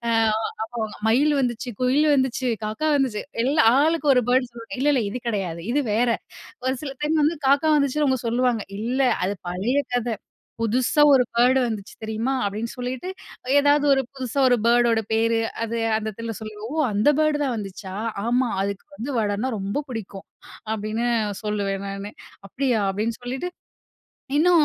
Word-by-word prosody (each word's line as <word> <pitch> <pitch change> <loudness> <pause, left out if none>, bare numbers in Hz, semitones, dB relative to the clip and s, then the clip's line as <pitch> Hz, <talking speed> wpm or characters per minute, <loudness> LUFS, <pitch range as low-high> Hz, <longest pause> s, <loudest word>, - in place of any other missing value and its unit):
அ - - +2 0.5
அப்போ 235 +1 -7 0.3
மயில் 290 +6 +4
வந்துச்சு, 245 0 -2
குயில் 265 +5 +3
வந்துச்சு, 260 -1 0 0.2
காக்கா 215 +9 -2
வந்துச்சு. 255 -6 0 0.2
எல்லா 285 +2 +3 0.2
ஆளுக்கு 320 -1 +1
ஒரு 250 - +5
பர்ட்ட 250 0 +3
சொல்ல, 230 -1 -9
"இல்லல்ல. 280 -3 +3
இது 250 - -5
கிடையாது. 185 -6 -2
இது 290 +2 +2
வேற." 240 +3 +2 0.6
ஒரு 260 - +2
சில 275 - -4
டைம் 310 +1 +2
வந்து 320 +3 +1
காக்கா 285 +3 +4
வந்துச்சுன்னு 290 +1 +1
அவங்க 260 -2 +1
சொல்லுவாங்க. 240 -2 +1 0.2
"இல்ல. 245 +4 -1 0.2
அது 200 +2 -1 0.2
பழைய 210 +10 0 0.2
கதை. 240 -1 0 0.5
புதுசா 250 +6 +2
ஒரு 255 -2 +5
பர்ட் 250 +2 +5
வந்துச்சு 215 -4 -5
தெரியுமா?" 220 +4 -1
அப்படின்னு 215 +3 -3
சொல்லிட்டு, 250 +7 -4 0.5
ஏதாவது 290 0 +3
ஒரு 270 - +3
புதுசா 260 0 -4
ஒரு 245 - +4
பர்ட்டோட 235 -1 +4
பேரு, 225 0 +2 0.2
அது 230 +1 -3 0.2
அந்த 220 0 -3
இடத்துல 230 +2 -5
சொல்லுவோ, 215 +2 -7 0.2
"அந்த 205 +6 +2
பர்ட் 305 -1 +2
தான் 255 -3 -1
வந்துச்சா! 195 -2 -7 0.3
ஆமா. 245 +1 +2
அதுக்கு 200 0 -4
வந்து 265 +5 -4
வடனா 210 +4 0
ரொம்ப 200 +9 -2
பிடிக்கும்." 205 -4 -7 0.5
அப்படின்னு 220 +2 -2 0.4
சொல்லுவேன் 200 -2 -2
நானு. 195 +1 -6 0.4
"அப்படியா?" 250 -1 0
அப்படின்னு 220 +4 -2
சொல்லிட்டு. 260 +8 -4 0.9
இன்னும் 335 -1 +5
240 Hz, 155 wpm, -23 LUFS, 215-270 Hz, 0.9 s, ஒரு